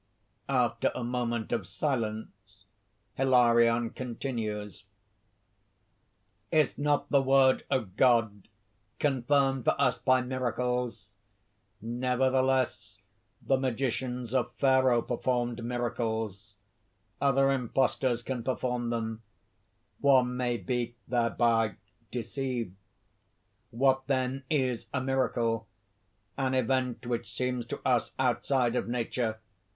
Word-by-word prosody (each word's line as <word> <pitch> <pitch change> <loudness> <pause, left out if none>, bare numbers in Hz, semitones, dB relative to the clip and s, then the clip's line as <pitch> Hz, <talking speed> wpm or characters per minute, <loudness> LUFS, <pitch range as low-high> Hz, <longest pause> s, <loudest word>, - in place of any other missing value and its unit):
_ - - -45 0.5
After - - +1
a 125 - -3
moment 120 -2 -2
of 115 -7 -1
silence 110 - -4 0.5
Hilarion 120 -3 +4
continues: 115 -5 -5 0.8
) - - -44
"Is 155 -3 +3
not 145 0 0
the 140 - +5
word 135 0 +4
of 105 -8 -1
God 115 -6 +3 0.5
confirmed 135 -1 +1
for - - +2
us 130 -3 +2
by 130 -1 +3
miracles? 125 -1 -2 0.7
Nevertheless 130 +2 0 0.5
the 135 -1 +2
magicians 125 -1 -2
of 130 -2 0
Pharaoh 130 -3 +4
performed 120 -1 -1
miracles; 110 -4 -3 0.7
other 135 0 +3
imposters 125 -1 0
can 130 -1 -3
perform 125 -1 -2
them; 115 -1 -3 0.8
one 130 -3 +4
may 125 -1 0
be 120 -1 -3
thereby 115 -3 +2 0.3
deceived. 120 -3 -3 1.0
What 130 +2 +1
then 130 0 -1
is 130 -6 0
a - - +2
miracle? 120 -4 0 0.7
An 130 -1 +1
event 130 -2 0
which 120 -2 -3
seems 125 +1 -2
to - - -5
us 125 -2 +1
outside 125 -1 +1
of - - -1
nature. 120 -2 -2
125 Hz, 105 wpm, -29 LUFS, 115-130 Hz, 1.0 s, the